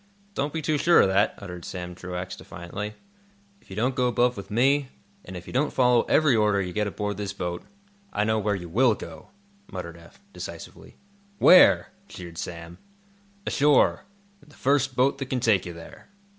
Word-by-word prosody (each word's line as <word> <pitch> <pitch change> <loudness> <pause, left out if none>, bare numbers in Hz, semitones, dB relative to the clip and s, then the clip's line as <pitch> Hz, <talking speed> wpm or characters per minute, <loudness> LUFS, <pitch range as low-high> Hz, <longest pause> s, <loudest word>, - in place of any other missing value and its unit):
"Don't 145 -4 -2
be 160 0 -4
too 150 -1 0
sure 170 +3 +5
of - - +3
that," 95 +2 +2
uttered 90 -3 -9
Sam 90 0 -6
Truax, 90 0 -6
defiantly. 100 +5 -7 0.7
"If - - -26
you 95 - -8
don't 125 +5 0
go 125 -1 +1
above 125 +1 +2
with 100 - -9
me, 135 +5 +2 0.3
and 90 0 -8
if 90 - -10
you - - -10
don't 140 +4 +1
follow 125 -2 +3
every 150 -5 +4
order 105 -2 +2
you 90 -2 -3
get 105 +1 0
aboard 105 0 -4
this 100 -1 -4
boat, 85 -2 -4 0.5
I 105 - 0
know 110 0 +1
where 105 0 0
you 90 -2 -6
will 115 +6 +3
go," 80 -5 -10 0.4
muttered 85 -3 -7
Eph, 85 0 -17
decisively. - - -10 0.4
"Where?" 185 +1 +6 0.2
jeered 85 -2 -9
Sam. 85 +1 -7 0.7
"Ashore—in 200 +6 0
the 145 - -19
first 135 -1 +1
boat 135 +2 +2
that 135 - -4
can 130 - -1
take 110 -7 +2
you 85 - -6
there." 85 0 -13
105 Hz, 185 wpm, -25 LUFS, 90-135 Hz, 0.7 s, Where